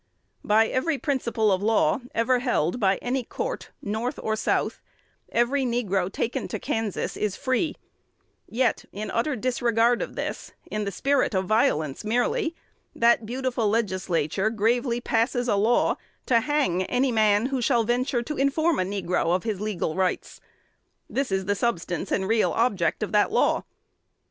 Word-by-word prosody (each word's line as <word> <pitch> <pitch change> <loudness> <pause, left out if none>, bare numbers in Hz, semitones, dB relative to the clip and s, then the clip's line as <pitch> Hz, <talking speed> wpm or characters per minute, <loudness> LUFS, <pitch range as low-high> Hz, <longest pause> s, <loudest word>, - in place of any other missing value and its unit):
By 220 +2 +4
every 300 +6 0
principle 240 -7 0
of 185 0 +1
law 215 -5 +2 0.2
ever 245 +2 +2
held 245 - 0
by 195 -3 +3
any 255 +1 -1
court, - - -5
North 225 +6 -2
or 220 - 0
South, 220 - -1 0.5
every 240 +4 +2
negro 200 -7 0
taken 230 +4 -2
to - - -4
Kansas 225 -3 -2
is 210 -3 -1
free; 285 +4 0 0.7
yet, 240 0 +1
in 210 +2 -5
utter 270 +5 0
disregard 240 0 +1
of - - -5
this, - - -5 0.2
in 210 -1 -2
the 200 - -2
spirit 270 +1 +1
of 190 0 +1
violence 180 - +1
merely, 245 +9 0 0.4
that 235 -1 +3
beautiful 250 -2 -1
Legislature 190 -3 0
gravely 235 +2 0
passes 240 +2 0
a 215 - +2
law 220 +4 +2 0.3
to 235 -2 +4
hang 265 - +1
any 255 +4 +1
man 215 -1 +3
who 265 -1 -1
shall 235 -1 +2
venture 240 +1 0
to 300 +5 -5
inform 305 +4 +2
a - - +2
negro 180 -3 0
of 185 - -2
his 215 -4 -3
legal 205 -7 -2
rights. 185 0 -2 0.7
This 270 -5 -2
is 190 0 0
the 205 - +1
substance 190 -5 -2
and 190 - 0
real 225 +1 +2
object 210 -6 +1
of 215 - -3
the 210 -1 +4
law. - - +1
225 Hz, 160 wpm, -25 LUFS, 200-250 Hz, 0.7 s, By